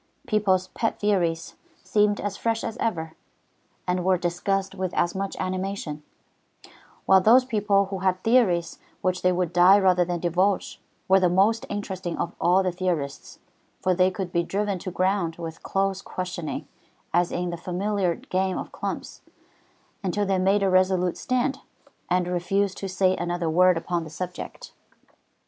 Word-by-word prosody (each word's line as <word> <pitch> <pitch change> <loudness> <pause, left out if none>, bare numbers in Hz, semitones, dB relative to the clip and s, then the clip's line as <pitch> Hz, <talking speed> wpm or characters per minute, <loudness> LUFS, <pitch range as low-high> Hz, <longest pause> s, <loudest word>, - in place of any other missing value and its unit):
People's 190 -3 +1
pet 225 - -2
theories 175 -6 0 0.3
seemed 205 +2 +2
as 205 -1 -3
fresh 225 +1 -1
as 225 - -4
ever, 160 -10 -2 0.7
and 180 0 0
were 185 0 +3
discussed 190 +3 -1
with 185 -2 -4
as 175 - +1
much 195 0 -4
animation; 185 -4 -3 1.0
while 190 -1 +6
those 245 +6 +6
people 205 -4 +2
who 195 - -3
had 185 0 +1
theories 185 -9 +2 0.2
which 185 0 0
they 180 - +3
would 180 -1 -1
die 180 +3 +7
rather 185 -3 +4
than 175 0 -2
divulge, 180 +4 0 0.3
were 190 0 +6
the 180 -2 +3
most 200 +5 +2
interesting 190 -4 -4
of 170 - -2
all 185 +2 +4
the 185 - 0
theorists, 170 -6 -3 0.4
for 185 - +1
they 185 +1 +3
could 185 -1 -5
be 170 - +2
driven 195 +2 -2
to 185 - -5
ground 185 -2 0
with 165 -1 -7
close 195 0 -1
questioning, 180 -5 -5 0.5
as 175 +1 +2
in 175 0 -2
the - - -3
familiar 185 +1 -1
game 185 0 -2
of - - -6
"clumps," - - -5 0.8
until 200 +2 0
they 195 -1 +1
made 195 +2 +2
a 195 - +3
resolute 185 -1 +2
stand, 255 +2 -1 0.5
and 180 0 +1
refused 190 +2 0
to 195 - -5
say 185 0 +2
another 175 -1 -2
word 180 +1 +5
upon 170 0 -2
the 160 - -9
subject. 180 - -7
185 Hz, 160 wpm, -25 LUFS, 175-195 Hz, 1.0 s, die